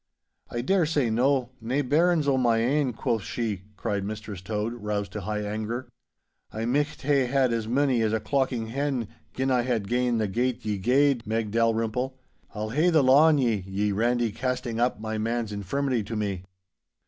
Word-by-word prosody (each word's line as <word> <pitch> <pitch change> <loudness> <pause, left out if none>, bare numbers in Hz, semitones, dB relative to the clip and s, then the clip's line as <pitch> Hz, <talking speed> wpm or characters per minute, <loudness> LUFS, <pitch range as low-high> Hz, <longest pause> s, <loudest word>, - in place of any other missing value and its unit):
'I 120 - -3
daresay 150 - +2
no, 125 +2 +2
"nae 130 +6 0
bairns 160 +3 +2
o' 140 - +3
my 120 -3 +3
ain," 130 +4 +1
quo' 115 0 -1
she,' 105 -2 -4
cried 100 -1 -2
Mistress 105 -2 -6
Tode, 105 +3 -2
roused 105 -4 -3
to 105 - -5
high 105 +2 -2
anger. 110 +4 -4 0.6
'I 110 +1 -3
micht 145 +5 -1
hae 140 -2 +2
had 130 -2 +2
as 115 -2 -2
mony 130 0 +2
as 110 -1 +1
a 110 - +1
clockin' 115 +1 -1
hen, 135 -2 -1 0.3
gin 130 +1 0
I 125 -1 +3
had 120 -5 -1
gane 125 0 +1
the 110 -1 0
gate 120 +3 -1
ye 105 -2 -1
gaed, 130 +2 +2
Meg 110 -1 -1
Dalrymple. 115 +3 0 0.4
I'll 110 +1 -3
hae 155 +8 +3
the 160 -4 +4
law 135 +5 +6
on 155 -2 +4
ye, 120 -5 +2
ye 100 +2 0
randy, 120 +2 +1
casting 125 0 -2
up 120 -2 +1
my 110 0 -3
man's 115 0 -1
infirmity 120 +5 -1
to 115 - -5
me. 100 -4 -3
120 Hz, 185 wpm, -26 LUFS, 110-130 Hz, 0.6 s, law